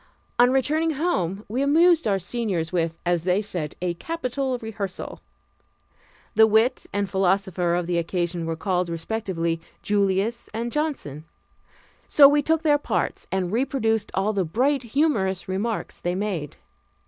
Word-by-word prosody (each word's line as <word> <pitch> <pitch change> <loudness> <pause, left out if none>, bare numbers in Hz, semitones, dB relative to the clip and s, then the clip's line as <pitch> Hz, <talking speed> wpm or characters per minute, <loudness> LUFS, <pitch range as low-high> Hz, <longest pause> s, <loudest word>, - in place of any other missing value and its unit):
On 245 +1 +7
returning 310 +5 +1
home 210 - -1
we 240 +6 -2
amused 325 +2 +4
our 200 -2 +2
seniors 185 -4 -2
with, 165 -2 0
as 175 -2 +1
they 180 +2 +2
said, 175 -8 -4
a 175 -1 0
capital 265 - -3
rehearsal. 210 -5 -6 1.1
The 220 0 +6
wit 220 +4 +2
and 205 0 -1
philosopher 190 -2 +1
of 175 0 -1
the 175 0 0
occasion 170 0 -2
were 165 - -1
called, 180 0 -1
respectively, 170 -2 -2 0.2
Julius 205 +3 0
and 235 +1 -2
Johnson; 265 - -3 0.8
so 285 -2 +8
we 290 +1 +3
took 320 +2 +1
their 295 -2 +4
parts - - -2
and 185 -2 -1
reproduced 225 -3 0
all 200 +3 +1
the 195 -2 +1
bright, 255 - +1
humorous 230 - 0
remarks 205 +5 -3
they 175 +1 -2
made. 185 -7 -3
205 Hz, 145 wpm, -24 LUFS, 180-255 Hz, 1.1 s, so